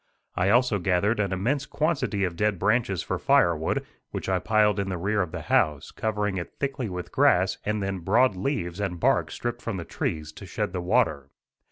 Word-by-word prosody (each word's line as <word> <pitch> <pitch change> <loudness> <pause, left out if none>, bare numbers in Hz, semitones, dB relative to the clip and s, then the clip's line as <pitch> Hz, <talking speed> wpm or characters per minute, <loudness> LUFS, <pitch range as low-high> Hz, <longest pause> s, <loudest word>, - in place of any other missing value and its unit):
I 95 +2 +2
also 120 -2 +3
gathered 95 +5 +1
an 100 -2 0
immense 130 +10 -1
quantity 135 -10 0
of 90 -2 -1
dead 105 +2 +1
branches 105 -1 +1
for - - -3
firewood, 80 -2 +2 0.2
which - - -5
I 95 -1 +2
piled 105 +1 +2
in 100 -1 -1
the 90 - -2
rear 100 +4 0
of 90 -3 -3
the - - -5
house, 75 -2 +1
covering 105 -3 -1
it 85 - -6
thickly 135 -5 -2
with 90 -1 -6
grass 95 +2 +3
and 105 -1 -1
then 95 -1 -2
broad 110 +6 +3
leaves 90 -4 -2
and 95 -4 -2
bark - - +2
stripped 120 -1 -4
from 115 -4 -3
the 85 - -5
trees, 80 -1 -3
to - - -11
shed - - -3
the 90 - -2
water. 90 - +1
100 Hz, 200 wpm, -26 LUFS, 90-110 Hz, 0.2 s, also